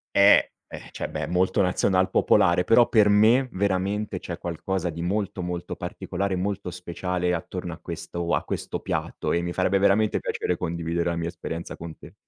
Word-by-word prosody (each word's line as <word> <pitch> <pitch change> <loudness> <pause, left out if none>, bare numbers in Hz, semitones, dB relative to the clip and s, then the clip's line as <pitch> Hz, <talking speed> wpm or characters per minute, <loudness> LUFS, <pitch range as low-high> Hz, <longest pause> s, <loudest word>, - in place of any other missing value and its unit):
Eh, 100 +1 +6 0.2
ehm, - - -9
cioè, - - -5
beh - - -3
è - - -3
molto 90 +3 +1
nazional 95 0 +2
popolare, 85 +1 +3
però 120 +1 +5
per 105 -3 +5
me 110 +6 +5
veramente 100 +1 -1
c'è 85 - -6
qualcosa 90 +2 -3
di 85 +1 -6
molto, 100 +1 -2
molto 90 0 -4
particolare, 100 -1 -3
molto 95 0 -2
speciale 90 0 -2
attorno 90 +1 -5
a - - -13
questo 85 0 -4
a - - +1
questo - - -4
piatto - - -3
e 85 - +1
mi 85 0 -3
farebbe 100 +2 +2
veramente 100 +2 +3
piacere 90 - -2
condividere 85 0 -2
la 85 - -2
mia 85 0 -2
esperienza 85 -1 -6
con 85 -1 -8
te. - - -14
90 Hz, 180 wpm, -25 LUFS, 85-100 Hz, 0.2 s, Eh